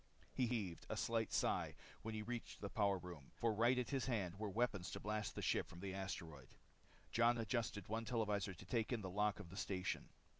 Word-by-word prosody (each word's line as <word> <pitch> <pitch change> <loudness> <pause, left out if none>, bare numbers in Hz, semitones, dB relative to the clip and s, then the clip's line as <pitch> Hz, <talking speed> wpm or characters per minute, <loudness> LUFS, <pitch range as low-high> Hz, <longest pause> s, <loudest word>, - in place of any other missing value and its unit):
He 125 - +3
heaved 105 -8 -2
a - - -1
slight 115 -1 +1
sigh - - +2 0.3
when 110 0 -3
he 105 - -2
reached 120 +1 -4
the 100 - -4
power 100 -3 +3
room, 85 -6 -8
for 115 -1 +2
right 120 +4 +5
at 125 +1 0
his 135 -2 +1
hand 100 -6 0
were 110 -1 -1
weapons 100 -4 +1
to - - -4
blast 105 0 -1
the - - -3
ship - - +2
from 85 - -9
the 95 0 -3
asteroid. 85 -8 -5 0.6
Jon 120 +1 +5
adjusted 115 -3 0
one 115 +2 -1
televisor 105 -5 +1
to 85 - -11
take 110 +5 +1
in 120 -3 +1
the 95 -2 -4
lock 105 +1 +3
to 105 - -7
the 90 +1 -10
station. 95 -1 -1
105 Hz, 215 wpm, -42 LUFS, 95-115 Hz, 0.6 s, right